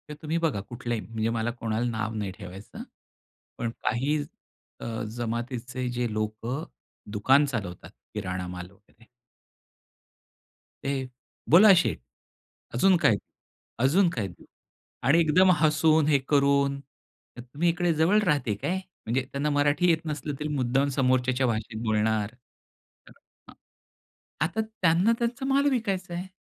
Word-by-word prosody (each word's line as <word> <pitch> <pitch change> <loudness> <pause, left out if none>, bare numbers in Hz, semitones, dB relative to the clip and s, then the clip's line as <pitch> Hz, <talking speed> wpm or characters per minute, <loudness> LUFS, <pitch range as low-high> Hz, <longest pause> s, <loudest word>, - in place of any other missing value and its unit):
तुम्ही 160 +2 -3
बघा, 160 -11 0
कुठल्याही 120 +1 -4
म्हणजे 115 0 -2
मला 115 0 -1
कोणाला 115 0 -2
नाव 110 0 -3
नाही 100 -3 -3
ठेवायचं. 95 0 -9 0.7
पण 115 - -2
काही 140 +6 +1 0.6
अ, - - -7 0.3
जमातीचे 120 +2 -3
जे 120 -2 -2
लोकं 110 +7 -3 0.5
दुकान 130 +8 +4
चालवतात, 100 -10 -5 0.2
किराणा 90 -3 -4
माल 90 0 -7
वगैरे. 105 +3 -25 1.8
ते, 135 -2 -2 0.4
"बोला 195 +5 +8
शेठ, 175 - +1 0.7
अजून 185 +9 +4
काय? 115 -10 +4 0.6
अजून 170 +8 +4
काय 105 -10 -3
देऊ?" 90 - -14 0.6
आणि 160 +5 +5
एकदम 180 +4 +5
हसून 155 0 +3
हे 145 -3 +4
करून, 140 -1 +3 0.6
"तुम्ही 140 +8 -1
इकडे 175 0 +1
जवळ 165 +7 +3
राहते 145 - +1
काय?" 175 - -2 0.3
म्हणजे 125 +3 0
त्यांना 145 +2 -1
मराठी 145 +4 +2
येत 160 0 +1
नसलं, 150 -1 -3
तरी 150 - -2
मुद्दाम 135 +2 +1
समोरच्याच्या 130 0 +2
भाषेत 110 0 -3
बोलणार. 110 0 0
तर 125 - -27 0.4
हां. - - -12 0.9
आता 210 +7 -1
त्यांना 200 -2 +2
त्यांचा 240 +3 -2
माल 280 +1 +3
विकायचा 195 -8 -2
आहे. 180 +2 -4
135 Hz, 125 wpm, -27 LUFS, 115-165 Hz, 1.8 s, बोला